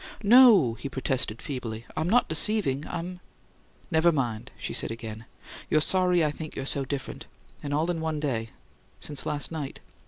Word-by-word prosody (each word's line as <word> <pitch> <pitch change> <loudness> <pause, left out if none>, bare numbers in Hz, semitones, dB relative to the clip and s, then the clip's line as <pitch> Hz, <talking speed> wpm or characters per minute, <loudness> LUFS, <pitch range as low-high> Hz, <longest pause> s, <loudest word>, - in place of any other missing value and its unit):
"Oh, - - -12
no," 215 - +7
he 120 +5 -6
protested, 130 -4 -2
feebly. 115 -5 -5
"I'm 160 - 0
not 245 +4 +4
deceiving. 160 -5 0
I'm 180 +2 -5 0.4
" - - -32
"Never 160 +1 +5
mind," 120 -8 -2
she - - -5
said - - -1
again. 115 -1 -7 0.4
"You're 155 - +4
sorry 180 +1 +3
I 150 - +1
think 155 +1 -8
you're 135 - -4
so 140 0 -2
different 135 0 -5 0.3
and 145 - -5
all 155 +4 +1
in 165 -2 -3
one 160 -1 -1
day 120 -7 -1 0.5
since 145 -3 -3
last 145 +1 -1
night. 150 -4 -5
150 Hz, 180 wpm, -27 LUFS, 130-170 Hz, 0.5 s, no